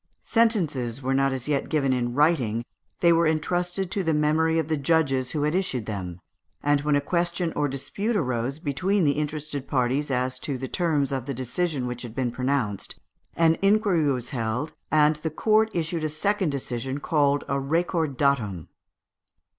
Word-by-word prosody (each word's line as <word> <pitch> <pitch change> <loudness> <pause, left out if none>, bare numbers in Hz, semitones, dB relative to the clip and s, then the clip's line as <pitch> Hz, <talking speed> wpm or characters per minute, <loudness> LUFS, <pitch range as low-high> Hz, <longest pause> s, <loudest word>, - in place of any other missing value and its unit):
Sentences 155 - +1
were 130 +1 0
not 135 0 +2
as 130 0 -4
yet 145 -2 0
given 140 -4 +1
in 120 -1 -1
writing: 130 -7 +2 0.4
they 170 -1 +6
were 165 0 +3
entrusted 175 +4 -1
to 200 - 0
the 160 -4 +1
memory 160 +2 +2
of 160 -2 0
the 160 - +1
judges 140 -3 +1
who 150 0 -2
had 150 +1 +1
issued 175 - -1
them; 95 -5 -5 0.4
and 145 0 +3
when 150 0 +1
a - - +4
question 175 +1 0
or 145 - +1
dispute 200 - -3
arose 130 - -1
between 180 +6 0
the 145 - +4
interested 150 -1 -3
parties 135 +2 0
as 130 0 -1
to 140 -1 -3
the 130 +1 -5
terms 150 -6 0
of 130 -1 -3
the 140 - -3
decision 130 +3 -2
which 125 0 -4
had 120 -2 -8
been 125 -2 -1
pronounced, 125 -5 -2 0.4
an 165 -1 +3
inquiry 195 -7 +3
was 125 0 -3
held, 125 +4 -2 0.2
and 150 0 +4
the 160 +1 -3
court 215 +7 +2
issued 165 -1 -2
a 155 - 0
second 190 +4 0
decision, 135 -1 -3
called 145 -1 +1
a 140 - 0
recordatum. 140 - 0
145 Hz, 175 wpm, -25 LUFS, 130-165 Hz, 0.4 s, they